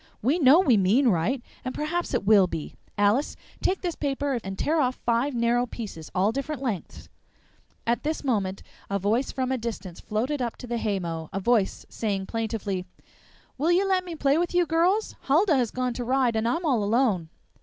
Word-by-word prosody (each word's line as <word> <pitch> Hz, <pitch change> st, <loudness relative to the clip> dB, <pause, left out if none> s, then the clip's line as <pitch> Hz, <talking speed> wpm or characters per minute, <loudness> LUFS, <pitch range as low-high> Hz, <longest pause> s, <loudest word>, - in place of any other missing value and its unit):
We 285 Hz, +10 st, +2 dB
know 285 Hz, +2 st, +7 dB
we 260 Hz, -, +4 dB
mean 220 Hz, +8 st, +4 dB
right, 220 Hz, +8 st, 0 dB, 0.2 s
and 255 Hz, -, -4 dB
perhaps 345 Hz, +4 st, -2 dB
it -, -, -1 dB
will 200 Hz, -3 st, +6 dB
be. 160 Hz, -4 st, -5 dB, 0.2 s
Alice, 205 Hz, +8 st, +2 dB, 0.3 s
take 380 Hz, -, 0 dB
this 350 Hz, -2 st, -2 dB
paper 280 Hz, -3 st, -1 dB
and 195 Hz, 0 st, -6 dB
tear 315 Hz, +1 st, +1 dB
off 255 Hz, -1 st, +1 dB
five 240 Hz, +4 st, 0 dB
narrow 240 Hz, +1 st, +2 dB
pieces, 200 Hz, -10 st, -7 dB
all 190 Hz, +3 st, +3 dB
different 275 Hz, +2 st, -4 dB
lengths." 220 Hz, -9 st, -4 dB, 0.8 s
At 235 Hz, +1 st, +1 dB
this 310 Hz, +1 st, -2 dB
moment 200 Hz, -8 st, -1 dB, 0.3 s
a 200 Hz, -, 0 dB
voice 215 Hz, +7 st, 0 dB
from 260 Hz, -1 st, -2 dB
a 260 Hz, -, 0 dB
distance 210 Hz, -6 st, -6 dB
floated 255 Hz, +7 st, -2 dB
up 235 Hz, -2 st, -2 dB
to -, -, -9 dB
the 240 Hz, -1 st, -2 dB
haymow 170 Hz, -7 st, -3 dB
a 195 Hz, -, -2 dB
voice 215 Hz, -1 st, +1 dB
saying 200 Hz, -4 st, -2 dB
plaintively: 210 Hz, -4 st, -3 dB, 0.7 s
"Will 320 Hz, +5 st, +2 dB
you 375 Hz, +3 st, +3 dB
let 375 Hz, -1 st, +2 dB
me 350 Hz, -2 st, -6 dB
play 285 Hz, 0 st, +2 dB
with 350 Hz, 0 st, -1 dB
you, 355 Hz, 0 st, +4 dB
girls? 345 Hz, +7 st, +1 dB
Huldah 320 Hz, +4 st, +4 dB
has 245 Hz, -4 st, +1 dB
gone 250 Hz, +1 st, -2 dB
to 245 Hz, -, -4 dB
ride, 250 Hz, -1 st, +1 dB
and 220 Hz, +1 st, +1 dB
I'm 330 Hz, +9 st, 0 dB
all 250 Hz, -8 st, +2 dB
alone." 205 Hz, -6 st, +1 dB
245 Hz, 195 wpm, -26 LUFS, 205-285 Hz, 0.8 s, know